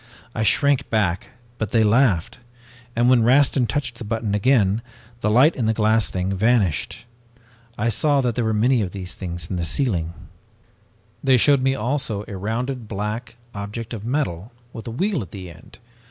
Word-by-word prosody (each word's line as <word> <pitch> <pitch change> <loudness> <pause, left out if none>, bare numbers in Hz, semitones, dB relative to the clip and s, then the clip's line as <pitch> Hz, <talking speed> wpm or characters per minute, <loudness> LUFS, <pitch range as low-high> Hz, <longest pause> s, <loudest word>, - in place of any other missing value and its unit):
I - - -3
shrank 140 +6 +2
back, 100 -5 0 0.3
but 110 - -2
they 110 0 +3
laughed, 115 -1 +2 0.6
and 120 +1 +2
when 125 -2 +5
Rastin 130 +1 +4
touched 125 0 -3
the - - -5
button 110 -1 -2
again, 105 -1 +2 0.4
the 105 - 0
light 130 +9 +5
in 115 -4 -1
the 110 - +1
glass 110 -1 +2
thing 95 +1 -2
vanished. 105 - +1 0.7
I 115 +3 0
saw 145 +6 +2
that 125 -2 0
there 120 - -1
were 110 - +1
many 115 +3 +2
of 95 -4 -3
these 95 -2 -5
things 85 -3 -5
in 95 - -2
the 85 - -2
ceiling. 85 - 0 1.1
"They 130 -1 +5
showed 140 +2 +4
me 135 +1 +1
also 115 -3 -2
a 100 - -7
rounded 115 +5 -3
black 110 +3 -4 0.2
object 105 +4 -6
of 110 -3 -6
metal 115 - -2 0.2
with 115 -1 -8
a - - -3
wheel 185 - -1
at 95 - -8
the 90 -2 -9
end. - - -16
110 Hz, 180 wpm, -22 LUFS, 100-125 Hz, 1.1 s, when